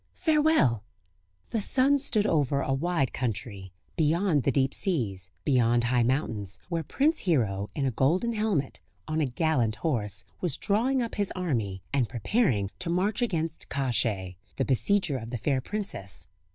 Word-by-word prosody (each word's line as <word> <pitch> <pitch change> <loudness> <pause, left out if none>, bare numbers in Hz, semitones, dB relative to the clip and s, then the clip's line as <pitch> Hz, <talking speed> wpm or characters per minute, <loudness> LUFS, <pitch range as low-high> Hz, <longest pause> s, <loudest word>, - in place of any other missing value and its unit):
Farewell." 300 - +3 0.7
The 225 - 0
sun 275 +6 +3
stood 225 -7 +1
over 145 -7 +2
a 135 - 0
wide 145 -1 0
country, 105 -6 -4 0.2
beyond 165 0 +2
the 140 - +1
deep 135 0 +1
seas, 105 - -1 0.2
beyond 120 -4 +3
high 120 +1 +2
mountains, 115 - -1
where 170 -2 -1
Prince 290 - +1
Hero 105 - 0
in 140 - 0
a 130 - +1
golden 175 - +1
helmet, 210 -11 -1 0.3
on 155 0 0
a 145 - +1
gallant 125 -5 +1
horse, 115 - 0
was 165 -6 -1
drawing 245 +6 +1
up 230 - -5
his 205 -2 0
army, 115 - -2
and 130 -5 +1
preparing 120 - +1
to 175 - -2
march 195 +6 0
against 165 -8 -2
Kosciey, 115 -9 0 0.2
the 135 - 0
besieger 155 - +1
of 115 0 -8
the 120 - -3
fair 130 +4 0
princess. 100 - -4
140 Hz, 155 wpm, -28 LUFS, 115-190 Hz, 0.7 s, Farewell